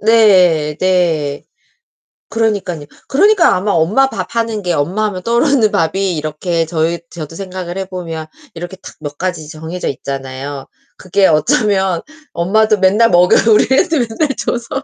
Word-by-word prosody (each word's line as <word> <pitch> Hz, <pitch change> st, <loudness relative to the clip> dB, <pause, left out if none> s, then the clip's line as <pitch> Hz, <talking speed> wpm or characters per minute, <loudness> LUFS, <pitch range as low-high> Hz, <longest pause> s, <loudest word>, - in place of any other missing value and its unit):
네, 185 Hz, -9 st, +4 dB
네. 165 Hz, -6 st, 0 dB, 0.9 s
그러니깐요. 200 Hz, -8 st, -1 dB, 0.2 s
그러니까 395 Hz, +5 st, +4 dB
아마 200 Hz, +3 st, -1 dB
엄마 195 Hz, +12 st, +3 dB
밥하는 230 Hz, -4 st, -3 dB
게 180 Hz, -2 st, -1 dB
엄마 180 Hz, +8 st, -1 dB
하면 185 Hz, -3 st, -4 dB
떠오르는 235 Hz, 0 st, +2 dB
밥이 180 Hz, +3 st, 0 dB
이렇게 155 Hz, +2 st, -2 dB
저희 165 Hz, +1 st, -1 dB
저도 165 Hz, -1 st, -8 dB
생각을 185 Hz, -2 st, -6 dB
해 195 Hz, -, -3 dB
보면 165 Hz, -4 st, -6 dB, 0.3 s
이렇게 175 Hz, +2 st, -7 dB
탁 185 Hz, -, -12 dB
몇 145 Hz, -1 st, -7 dB
가지 170 Hz, -4 st, -3 dB
정해져 160 Hz, +3 st, -6 dB
있잖아요. 135 Hz, +1 st, -5 dB, 0.3 s
그게 190 Hz, +2 st, +1 dB
어쩌면 190 Hz, +3 st, +1 dB, 0.3 s
엄마도 215 Hz, +5 st, +2 dB
맨날 205 Hz, +5 st, +4 dB
먹여 175 Hz, +1 st, +5 dB
우리 210 Hz, -, +4 dB
애한테 325 Hz, +3 st, +3 dB
맨날 240 Hz, +5 st, 0 dB
줘서 245 Hz, +3 st, -3 dB
185 Hz, 310 characters per minute, -15 LUFS, 160-215 Hz, 0.9 s, 먹여